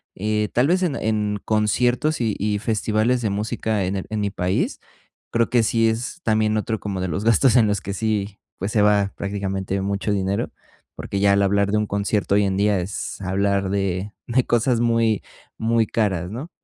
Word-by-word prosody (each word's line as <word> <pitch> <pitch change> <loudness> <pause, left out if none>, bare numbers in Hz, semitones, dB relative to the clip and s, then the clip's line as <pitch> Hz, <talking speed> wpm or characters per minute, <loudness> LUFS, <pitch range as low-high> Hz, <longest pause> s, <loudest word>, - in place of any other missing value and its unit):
Eh, 105 +1 -1
tal 125 +3 +3
vez, 185 +3 +2
en 170 -7 0
en 105 -3 -1
conciertos, 120 +7 +1
y 110 -4 0
y 105 +1 0
festivales 110 +3 0
de 110 - 0
música 105 +1 -1
en 95 +2 -2
el 95 - -3
en 110 - -2
mi 100 -1 -1
país, 90 -1 -1 0.5
creo 115 0 +1
que 120 - +4
sí 115 +2 +2
es 120 +10 -4
también 110 -1 +2
otro 110 0 -2
como 100 -3 -4
de 95 - -1
los 95 +4 -3
gastos 115 +3 +4
en 115 -4 +5
los 105 -1 0
que 100 - -5
sí, 105 -2 -2 0.2
pues, 100 +3 -3
se 105 - +2
va 105 -1 +3
prácticamente 100 -1 -3
mucho 100 +2 -1
dinero, 100 0 -1 0.4
porque 100 - -4
ya 100 0 +4
al 100 - +3
hablar 100 0 +2
de 105 - +2
un 105 - +1
concierto 100 0 0
hoy 105 - +4
en 95 -1 -1
día, 100 -1 +2
es 95 +2 -5
hablar 100 +1 0
de 100 +1 -2
de 125 +1 +2
cosas 120 0 +2
muy, 115 -2 +2 0.4
muy 115 0 +2
caras, 95 -5 -1
¿no? 135 +9 -6
105 Hz, 200 wpm, -22 LUFS, 100-115 Hz, 0.5 s, en